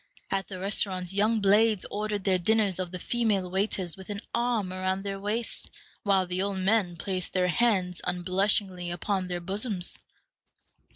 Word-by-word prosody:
At 195 0 0
the 190 - -6
restaurants 185 -1 0
young 215 +2 +2
blades 210 +1 +4
order 210 0 -1
their 190 -2 +1
dinners 205 0 +2
of 185 -1 -2
the 180 - -5
female 205 -3 0
waiters 190 -3 +1
with 190 +1 -12
an 205 -1 -3
arm 235 -6 0
around 185 +1 -1
their 195 -1 -4
waists, 215 +4 -3 0.3
while 195 -2 +3
the 180 +1 -2
old 200 0 -1
men 190 -2 +2
place 185 +2 -2
their 180 -1 +1
hands 185 -4 +1
unblushingly 185 0 +1
upon 185 +2 -2
their 175 -1 -3
bosoms. 195 0 -1
195 Hz, 160 wpm, -28 LUFS, 185-210 Hz, 0.3 s, blades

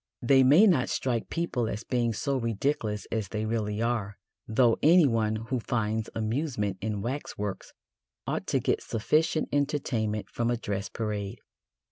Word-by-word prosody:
They 135 +2 +5
may 145 +11 +7
not 165 -12 +3
strike 120 -4 -1
people 140 -9 -1
as 105 - -4
being 120 -2 0
so 140 +5 -1
ridiculous 115 -2 -1
as 110 -3 -1
they 105 +2 -3
really 110 -1 -1
are, 110 -4 -1 0.3
though 115 +1 +3
anyone 130 -10 +4
who 115 +4 -3
finds 110 -2 -1
amusement 110 -4 -1
in 105 -2 -2
waxworks 115 -6 -4 0.5
ought - - -3
to - - +1
get - - 0
sufficient 155 +8 +1
entertainment 120 -7 -1
from 120 0 -2
a 120 - +1
dress 100 -3 -3
parade. 105 -3 -4
115 Hz, 145 wpm, -28 LUFS, 105-135 Hz, 0.5 s, may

